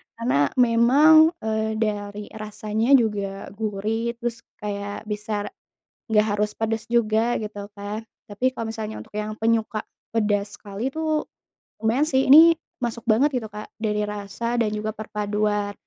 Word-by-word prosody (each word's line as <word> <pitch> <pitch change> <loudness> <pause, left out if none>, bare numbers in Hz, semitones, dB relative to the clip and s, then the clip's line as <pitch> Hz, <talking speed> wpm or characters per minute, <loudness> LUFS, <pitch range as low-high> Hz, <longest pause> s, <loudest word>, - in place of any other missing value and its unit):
Karena 230 - +2
memang, 280 +7 +6
eee, 220 0 -1
dari 205 -1 -2
rasanya 215 +2 -2
juga 200 -5 0
gurih, 220 +3 -2
terus 235 -1 -4 0.2
kayak 205 0 -4
bisa 210 0 -3 0.7
nggak 210 0 +4
harus 210 0 0
pedas 225 0 -2
juga 230 0 +2
gitu 205 -1 -6
Kak, 205 +2 -6 0.2
tapi 250 +6 0
kalau 230 -3 -4
misalnya 220 -1 -5
untuk - - -13
yang 210 0 -2
penyuka 225 -1 +1 0.3
pedas 205 -2 0
sekali 210 +6 -4
tuh, 315 0 -1 0.6
lumayan 235 +7 +2
sih 265 -2 +2
ini 325 +4 +8 0.2
masuk 235 -2 -3
banget 235 +7 +5
gitu 220 - -7
Kak, 210 0 -7
dari 210 -1 -1
rasa 210 +4 -3
dan 215 -2 +1
juga 215 0 -2
perpaduan, 210 -1 -1
220 Hz, 140 wpm, -24 LUFS, 210-235 Hz, 0.7 s, ini